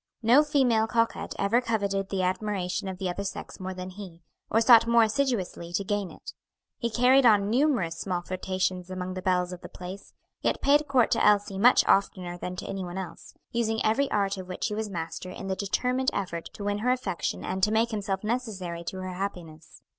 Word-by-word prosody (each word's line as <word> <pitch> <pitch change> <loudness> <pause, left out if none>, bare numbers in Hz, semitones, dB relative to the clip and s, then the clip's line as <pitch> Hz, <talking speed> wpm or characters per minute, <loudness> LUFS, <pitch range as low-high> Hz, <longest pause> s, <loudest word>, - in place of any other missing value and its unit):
No 245 +7 +6
female 250 -7 +2
coquette 230 0 -1
ever 210 +5 +2
coveted 200 -4 -1
the 190 -2 -1
admiration 190 0 -1
of 190 -1 -5
the 190 0 -3
other 180 +3 -3
sex 195 - -6
more 185 0 -5
than 185 0 -6
he, 180 -4 -10 0.3
or 225 - +3
sought 230 0 +7
more 235 0 +5
assiduously 220 -8 -1
to 200 - 0
gain 205 -1 -2
it. - - -10 0.5
He 235 - -1
carried 250 +4 +4
on 210 -3 +4
numerous 235 - +1
small 180 -2 -2
flirtations 185 0 -2
among 185 0 -4
the 185 - -5
belles 180 -1 +1
of 180 - -9
the - - -9
place, 185 +2 -9 0.3
yet - - 0
paid 295 +1 +3
court 255 -4 +3
to - - +2
Elsie 205 -2 +3
much 245 +5 +6
oftener 185 -3 +1
than 180 +1 -5
to - - -6
any 195 -1 -4
one 175 +1 -6
else, 175 -3 -8 0.2
using 225 -2 0
every 270 +6 +2
art 200 -1 0
of 185 -1 -7
which 185 +4 -3
he - - -4
was 215 0 -3
master 170 0 -5
in 185 - -8
the 190 0 -1
determined 250 +7 0
effort 175 -4 -4
to 205 - -8
win 205 0 -1
her 240 +4 0
affection 250 -9 -2
and 190 +1 -3
to 210 +3 +3
make 225 +2 +2
himself 195 -2 -2
necessary 205 -7 -3
to 190 - -5
her 185 0 -5
happiness. 175 -5 -7
200 Hz, 205 wpm, -27 LUFS, 185-225 Hz, 0.5 s, sought